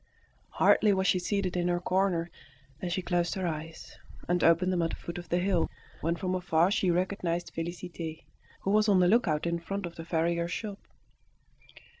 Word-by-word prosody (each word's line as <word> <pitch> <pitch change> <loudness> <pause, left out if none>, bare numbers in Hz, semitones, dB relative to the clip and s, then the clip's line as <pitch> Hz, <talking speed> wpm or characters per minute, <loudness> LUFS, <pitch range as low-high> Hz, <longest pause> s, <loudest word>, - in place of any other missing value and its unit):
Hardly 210 -2 +4
was 190 0 0
she 185 - +3
seated 190 0 -1
in 175 0 +1
her 175 0 +1
corner 180 -2 0 0.5
than 180 - -3
she 180 +1 -2
closed 175 -1 0
her 190 -1 -2
eyes, 155 -5 -6 0.3
and 175 0 +1
opened 175 +3 +4
them 175 - +1
at 165 - +1
the - - -4
foot 170 +1 -7
of 175 -2 -11
the 175 - +2
hill, 180 -2 +1 0.3
when 165 +2 0
from 185 +2 -2
afar 175 -1 +2
she 190 -2 +2
recognised 175 -1 -1
Félicité, 165 -1 -5 0.4
who 195 - -1
was 215 +1 +4
on 195 -2 +5
the 180 - +5
lookout 180 -8 +2
in 170 0 0
front 195 +3 -4
of 170 - -8
the 165 - -6
farrier's 170 +1 0
shop. 205 -1 -4
175 Hz, 190 wpm, -29 LUFS, 170-185 Hz, 0.5 s, on